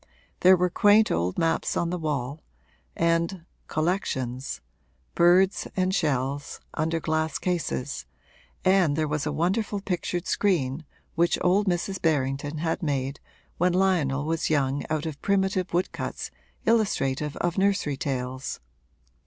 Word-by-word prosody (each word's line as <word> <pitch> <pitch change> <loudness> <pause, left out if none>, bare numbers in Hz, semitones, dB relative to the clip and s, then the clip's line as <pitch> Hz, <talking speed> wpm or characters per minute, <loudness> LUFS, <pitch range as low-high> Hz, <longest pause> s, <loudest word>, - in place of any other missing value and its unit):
There 185 +1 +7
were 180 0 +1
quaint 210 +4 +5
old 85 +2 0
maps 165 0 +1
on 170 0 0
the 180 - -1
wall, 145 -2 -3 0.5
and 170 +1 0 0.2
'collections' 135 -7 -2 0.5
birds 180 +3 +4
and 185 0 +1
shells 145 -4 -1
under 165 +1 0
glass 160 0 -1
cases, 70 - -2 0.6
and 185 -6 +4
there 155 0 0
was 150 0 -1
a - - 0
wonderful 195 +7 0
pictured 180 -2 -2
screen 155 -7 0 0.3
which 170 +1 +2
old 195 +3 +3
Mrs. 185 +2 -1
Berrington 145 -1 0
had 165 +3 -1
made 140 -3 -2 0.4
when 180 +1 +3
Lionel 165 -7 +2
was 165 0 -1
young 140 -2 +1
out 155 0 -1
of 155 -3 -5
primitive 190 -2 +1
woodcuts 175 +2 -2 0.3
illustrative 150 - +1
of 175 +2 -1
nursery 195 -7 +1
tales. 130 -1 -3
165 Hz, 130 wpm, -26 LUFS, 145-185 Hz, 0.6 s, There